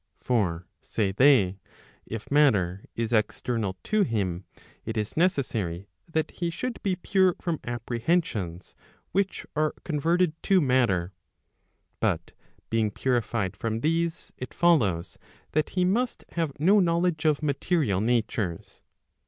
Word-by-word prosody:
] - - -44
For 90 -8 0 0.2
say 105 -4 -1
they, 100 -5 +4 0.5
if 110 +3 -7
matter 105 -11 +3
is 115 0 -2
external 110 -2 0
to 215 0 +1
him, 100 - -1 0.4
it 110 0 -4
is 105 -1 -2
necessary 110 - 0 0.2
that 160 -1 0
he 170 -1 -2
should 245 +8 -4
be 190 -2 0
pure 185 0 +2
from 170 -3 -2
apprehensions 115 - -2 0.4
which 195 0 -1
are 155 0 +1
converted 165 +2 +1
to 195 -2 +4
matter; 120 - +2 0.9
but 85 0 0 0.4
being 110 -1 +2
purified 115 -4 -1
from 110 +1 -3
these, 165 +2 -1
it 125 - -7
follows 110 - +2 0.3
that 155 +1 +1
he 180 - +4
must 235 +7 0
have 160 -5 -3
no 195 +7 +5
knowledge 170 -2 +1
of 155 -1 +2
material 140 - +1
natures. 110 -6 -1
125 Hz, 130 wpm, -27 LUFS, 105-170 Hz, 0.9 s, no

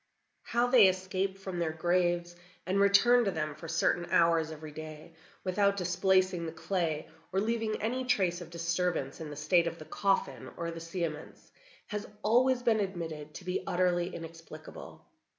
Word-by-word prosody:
How 240 +1 +1
they 245 -5 +7
escape 190 +1 -1
from 190 -2 -5
their 165 -2 0
graves 175 +1 0 0.3
and 190 +3 +1
return 200 +5 +5
to - - +2
them 155 -4 -2
for 155 +3 -10
certain 170 +1 +1
hours 165 -1 +3
every 155 -1 -8
day, 155 +1 -9 0.3
without 200 +2 +2
displacing 185 -1 +2
the - - -4
clay 165 -3 -2 0.2
or 190 - +1
leaving 220 +1 -1
any 245 +4 -1
trace 185 -8 +1
of 170 - -9
disturbance 170 -3 -2
in 155 - -6
the 145 - -7
state 165 +4 +2
of 170 - -4
the 155 - -10
coffin 195 +3 -1
or 170 0 -3
the 165 - -7
cerements, 165 -2 -5 0.3
has 210 0 -5 0.2
always 245 +3 +3
been 230 -3 +3
admitted 160 -6 -4
to 180 - -9
be 180 0 -1
utterly 175 0 +1
inexplicable. 165 -1 -10
175 Hz, 165 wpm, -31 LUFS, 165-195 Hz, 0.3 s, they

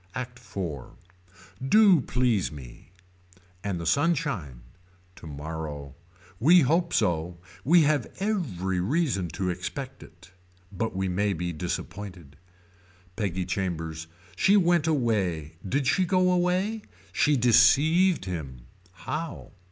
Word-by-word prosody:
ACT 125 -1 -6
IV. 90 - -6 0.8
Do 195 +2 +5
please 125 -7 0
me. 65 -3 -12 0.7
And 100 -4 -2
the 85 - -5
sunshine. 140 - 0 0.5
Tomorrow. 75 -2 -7 0.5
We 170 +9 +6
hope 170 +5 +1
so. 85 -3 0 0.3
We 165 +6 +5
have 150 -1 +1
every 115 - -1
reason 120 - 0
to 90 +2 -2
expect 110 +10 -6
it. 85 +3 -16 0.4
But 105 +1 -3
we 95 0 -1
may 100 +3 0
be 85 0 -3
disappointed. 90 -2 -6 0.8
Peggy 95 -4 -2
Chambers. 80 -4 -3 0.3
She 195 - +4
went 175 -4 +3
away. 100 - 0
Did 140 +4 0
she 185 +8 +2
go 185 +1 +2
away. 180 +5 0 0.3
She 150 -1 +3
deceived 155 - +4
him. 75 -9 -6 0.3
How. 155 - -6
105 Hz, 115 wpm, -26 LUFS, -, 0.8 s, We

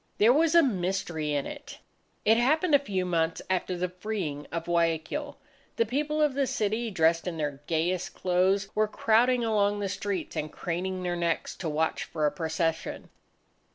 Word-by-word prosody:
There 225 +4 +6
was 320 +3 +3
a 335 - +8
mystery 180 - -1
in 140 -1 0
it. - - -8 0.5
It 220 - +6
happened 310 +7 +2
a 285 - +8
few 195 -9 -2
months 165 -2 0
after 185 -1 -1
the 180 +1 -1
freeing 180 -6 -4
of 165 0 -3
Guayaquil. 170 - -1 0.4
The 230 - +2
people 300 +6 0
of 295 -3 +2
the 275 0 +1
city, 220 +2 -1
dressed 165 -2 +2
in 170 -2 -3
their 145 -2 -3
gayest 170 +2 -1
clothes, 190 +2 +2
were 215 0 +2
crowding 235 +3 +3
along 205 -2 +2
the 200 - -1
streets, 200 -2 -3
and 150 0 -3
craning 185 +2 -3
their 175 -1 -1
necks 170 -1 -1
to 165 - -3
watch 155 +2 0
for 155 -2 -2
a 150 - +3
procession. 165 -1 -2
185 Hz, 175 wpm, -28 LUFS, 165-225 Hz, 0.5 s, a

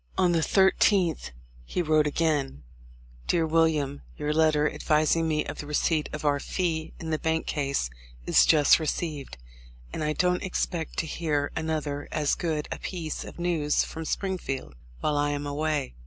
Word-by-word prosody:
On 180 -2 +4
the 170 - +2
13th, 190 - +3 0.3
he 175 - -2
wrote 155 -1 +3
again: 145 - 0 0.6
''Dear 165 -2 +2
William: 155 -3 +1
— - - -23
Your 150 0 -1
letter, 155 -1 +3
advising 155 +2 +1
me 155 -1 0
of - - -6
the 145 - -6
receipt 150 +1 +1
of 150 0 -6
our 145 -1 +2
fee 160 -1 -2
in 160 -1 -5
the 155 - 0
bank 160 0 0
case, 140 - -1 0.3
is - - +5
just 150 -1 +6
received, 150 - -3 0.6
and - - -3
I 150 0 0
don't 180 +2 +1
expect 175 -3 -3
to - - 0
hear 150 -3 -1
another 155 -3 -2
as 150 -2 +1
good 155 -3 -2
a - - -4
piece 165 -5 -4
of - - -10
news 165 -4 +1
from 160 0 -6
Springfield 180 -7 -3 0.3
while 150 - +1
I 145 0 +2
am 145 0 -2
away." 145 - -1
155 Hz, 170 wpm, -27 LUFS, 145-165 Hz, 0.6 s, just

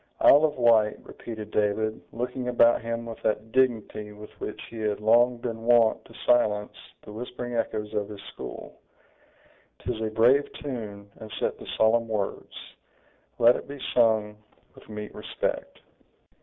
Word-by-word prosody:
"Isle 145 +3 +7
of 150 -1 -1
Wight!" 115 -4 +4
repeated 110 -2 -8
David, 110 +1 0
looking 125 +2 -4
about 120 -1 +4
him 115 0 -4
with 115 -1 -8
that 110 +1 -1
dignity 115 -5 0
with 105 +1 -12
which - - -5
he 115 - -9
had 105 -1 -1
long 120 +3 +4
been 115 -1 -5
wont 115 -1 +4
to - - -16
silence 105 -4 +2 0.3
the - - -11
whispering 120 +2 -6
echoes 110 -2 -2
of 105 -1 -2
his 105 -1 -9
school; - - -9 1.0
"'tis 115 -3 -4
a 110 - -1
brave 120 +6 +3
tune, 105 -7 -7
and 110 -1 -10
set - - -1
to - - -11
solemn 115 +1 +3
words! 105 -3 -3 0.8
let 120 +1 +6
it - - -6
be 140 0 -8
sung 110 -3 +3 0.4
with - - -17
meet 105 -1 -7
respect!" - - -4
115 Hz, 155 wpm, -26 LUFS, 105-120 Hz, 1.0 s, Isle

